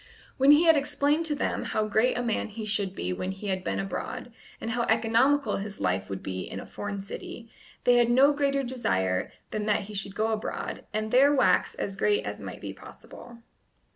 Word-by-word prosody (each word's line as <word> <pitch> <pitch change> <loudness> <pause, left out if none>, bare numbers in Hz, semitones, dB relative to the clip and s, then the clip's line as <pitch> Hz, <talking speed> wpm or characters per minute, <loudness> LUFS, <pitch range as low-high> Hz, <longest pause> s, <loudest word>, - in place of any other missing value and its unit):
When 270 +1 +4
he 295 +3 +8
had 325 -1 +6
explained 290 +2 +1
to 300 - 0
them - - -1
how 215 - -1
great 220 +4 +2
a 245 - -1
man 230 -2 -1
he 215 0 -7
should 200 -2 -1
be 90 +1 -2
when 185 - -4
he 195 +1 -6
had 185 -1 -1
been 95 - -2
abroad, 95 0 -5 0.3
and 225 - -4
how 240 +1 0
economical 230 +6 +2
his 200 0 -6
life 95 +1 -1
would 95 -1 -5
be 95 -1 -4
in - - -6
a - - -8
foreign 205 -1 -5
city, 225 +3 -8 0.3
they 245 0 +5
had 240 -1 +4
no 270 +4 +5
greater 275 -1 +1
desire 95 - -1 0.2
than 210 0 -2
that 210 0 +2
he 210 +1 -9
should 195 0 -4
go 220 +1 +1
abroad, 220 -1 -4
and 215 0 -2
there 275 +3 +6
wax 265 - +3
as 195 - -4
great 205 +1 +1
as - - -5
might - - -8
be - - -5
possible. 235 -1 -13
220 Hz, 210 wpm, -27 LUFS, 195-255 Hz, 0.3 s, he